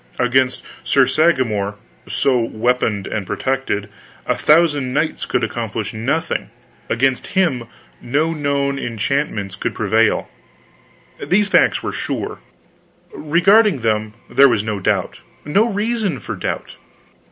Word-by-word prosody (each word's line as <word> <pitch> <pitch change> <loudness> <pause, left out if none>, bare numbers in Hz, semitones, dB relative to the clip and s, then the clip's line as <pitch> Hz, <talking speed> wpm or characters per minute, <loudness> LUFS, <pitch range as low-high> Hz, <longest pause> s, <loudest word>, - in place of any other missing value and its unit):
Against 130 +1 +1 0.2
Sir 135 -2 +4
Sagramor, 120 -11 +1 0.3
so 130 -3 +1
weaponed 115 -3 0
and 100 -4 -4
protected, 130 -6 -2 0.4
a - - +1
thousand 145 -5 +3
knights 155 +1 -1
could 120 - 0
accomplish 110 -2 -3
nothing; 140 +10 -2 0.4
against 130 +2 +1
him 145 -11 +2 0.4
no 150 +6 0
known 140 -2 -1
enchantments 115 -4 -2
could - - -3
prevail. 110 +1 +2 1.0
These 195 +7 +2
facts - - +3
were - - -3
sure; - - -4 0.7
regarding 195 - +3
them 110 -1 -1
there 140 +1 +5
was 110 -4 +1
no 110 -2 -3
doubt, 95 - -1 0.3
no 210 +10 +2
reason 210 - -1
for - - -6
doubt. - - -5
130 Hz, 120 wpm, -19 LUFS, 110-155 Hz, 1.0 s, there